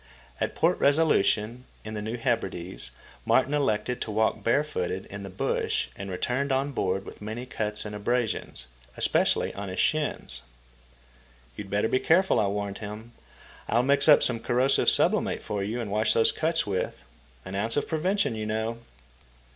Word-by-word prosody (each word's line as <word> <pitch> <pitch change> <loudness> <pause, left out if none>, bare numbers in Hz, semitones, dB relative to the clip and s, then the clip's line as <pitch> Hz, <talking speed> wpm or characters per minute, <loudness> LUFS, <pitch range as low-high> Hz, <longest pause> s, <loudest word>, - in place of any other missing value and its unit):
At - - -2
Port 170 +3 +2
Resolution, 125 -6 +2 0.2
in 110 - -6
the 105 - -4
New 110 +3 -3
Hebrides, 95 - -2 0.3
Martin 140 - +3
elected 125 -4 0
to - - -3
walk 110 +1 +1
barefooted 115 -8 0
in 100 0 -6
the 100 - -7
bush 95 - -1
and 100 0 -6
returned 125 +9 -1
on 135 +2 +1
board 95 -6 -1
with - - -11
many 110 +4 -5
cuts 105 -3 -3
and 105 - -6
abrasions, 110 - -1 0.3
especially - - +2
on 100 -1 -6
his 95 0 -5
shins. 145 - 0 1.1
"You'd 105 -2 -7
better 105 +2 +1
be 130 - +1
careful," 175 +8 +3
I 105 - +2
warned 100 0 -3
him. 110 +2 -8 0.6
"I'll 120 +3 +3
mix 140 +3 +3
up 150 - +8
some 115 -2 +1
corrosive 125 +4 +3
sublimate - - +2
for 100 -1 -2
you 110 +4 -3
to 115 -3 -3
wash 105 +2 +2
those 115 - +4
cuts 165 +1 0
with. 100 -2 -3 0.4
An 95 - -7
ounce 110 +6 0
of 145 - 0
prevention, 185 - +1
you 110 -1 -4
know." 110 +2 -2
110 Hz, 165 wpm, -27 LUFS, 100-135 Hz, 1.1 s, up